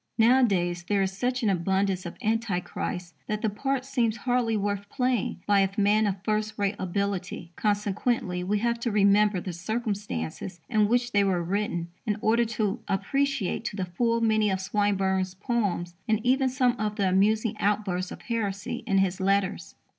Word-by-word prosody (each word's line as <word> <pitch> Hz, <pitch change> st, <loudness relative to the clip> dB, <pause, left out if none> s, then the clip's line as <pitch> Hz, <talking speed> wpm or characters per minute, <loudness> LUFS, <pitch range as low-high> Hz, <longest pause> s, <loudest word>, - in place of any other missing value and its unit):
Nowadays, 205 Hz, -8 st, +3 dB
there 200 Hz, -1 st, +2 dB
is 190 Hz, 0 st, -2 dB
such 250 Hz, +4 st, -1 dB
an 215 Hz, -, +3 dB
abundance 190 Hz, 0 st, 0 dB
of 170 Hz, -, -8 dB
anti 220 Hz, -4 st, +1 dB
Christs 180 Hz, -1 st, -5 dB
that 215 Hz, +1 st, -3 dB
the 220 Hz, -, +1 dB
part 270 Hz, +4 st, -2 dB
seems 240 Hz, -5 st, 0 dB
hardly 245 Hz, -3 st, +1 dB
worth 205 Hz, 0 st, -2 dB
playing 250 Hz, -8 st, -1 dB
by 205 Hz, -1 st, +4 dB
a 195 Hz, -1 st, +3 dB
man 210 Hz, +1 st, +4 dB
of 195 Hz, -1 st, -3 dB
first 215 Hz, 0 st, -1 dB
rate 200 Hz, -1 st, +1 dB
ability. 185 Hz, -2 st, -3 dB
Consequently, 205 Hz, -2 st, 0 dB
we 205 Hz, +3 st, +1 dB
have 235 Hz, +2 st, 0 dB
to 235 Hz, -, -1 dB
remember 205 Hz, -1 st, +4 dB
the 180 Hz, 0 st, -5 dB
circumstances 195 Hz, -, -4 dB
in 215 Hz, -3 st, +3 dB
which 245 Hz, +2 st, +1 dB
they 205 Hz, -2 st, +4 dB
were 185 Hz, -3 st, +1 dB
written 175 Hz, -2 st, -2 dB, 0.2 s
in 210 Hz, -1 st, +1 dB
order 230 Hz, +3 st, +3 dB
to 215 Hz, 0 st, -1 dB
appreciate 270 Hz, +2 st, 0 dB
to 210 Hz, -, -3 dB
the 190 Hz, -2 st, -2 dB
full 230 Hz, +6 st, 0 dB
many 215 Hz, -2 st, +3 dB
of 190 Hz, -1 st, 0 dB
Swinburne's 190 Hz, -1 st, 0 dB
poems 200 Hz, -5 st, -1 dB
and 220 Hz, -1 st, +2 dB
even 260 Hz, +1 st, +3 dB
some 250 Hz, -1 st, +2 dB
of 210 Hz, 0 st, -1 dB
the 200 Hz, -2 st, +1 dB
amusing 215 Hz, +4 st, +2 dB
outbursts 195 Hz, -3 st, 0 dB
of -, -, -9 dB
heresy 200 Hz, -4 st, -2 dB
in 195 Hz, -3 st, +2 dB
his 190 Hz, -1 st, +1 dB
letters. 190 Hz, -3 st, 0 dB
205 Hz, 175 wpm, -27 LUFS, 190-230 Hz, 0.2 s, by